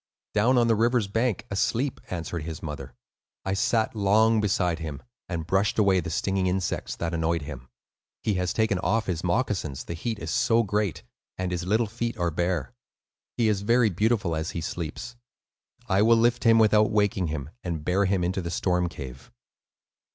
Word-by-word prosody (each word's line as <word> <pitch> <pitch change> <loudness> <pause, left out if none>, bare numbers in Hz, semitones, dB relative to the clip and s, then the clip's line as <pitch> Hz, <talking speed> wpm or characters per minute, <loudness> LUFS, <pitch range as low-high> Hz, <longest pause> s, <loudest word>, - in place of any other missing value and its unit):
"Down 120 +5 +3
on 120 -1 +4
the 115 - +4
river's 115 +1 +2
bank 115 0 0
asleep," 120 +7 0
answered 85 -1 -4
his 80 0 -6
mother. 70 -4 -6 0.5
"I 95 - 0
sat 110 +5 +1
long 110 +2 +3
beside 90 -5 +1
him, 75 -4 -6 0.3
and 85 -3 -3
brushed 95 +5 +1
away 100 -3 +4
the 90 - -4
stinging 95 +3 0
insects 90 -1 -2
that 85 0 -3
annoyed 80 -1 0
him. 70 -3 -8 0.6
He 110 - +1
has 90 -2 0
taken 110 -4 +1
off 110 +5 +1
his 85 -3 -2
moccasins, 90 - -1
the - - -6
heat 110 +7 -3
is - - -5
so 115 0 +3
great, 105 -4 -1 0.3
and 90 -1 -2
his 90 0 -3
little 110 +4 +2
feet 115 +2 -4
are 85 -1 0
bare. 85 -5 -1 0.6
He 115 -2 +3
is 105 -2 +1
very 115 +1 +3
beautiful 105 -2 +1
as 80 +1 -2
he - - -2
sleeps. 90 +10 -5 0.7
I 95 +1 +3
will 115 +2 +5
lift 120 +1 +2
him 115 0 +6
without 110 -1 +5
waking 105 -4 +1
him, 75 -2 -4
and 85 -5 -4
bear 95 +3 +2
him 95 -2 +1
into 95 +2 -1
the 85 - -4
storm 90 0 0
cave." 65 -4 -9
95 Hz, 180 wpm, -26 LUFS, 85-110 Hz, 0.7 s, him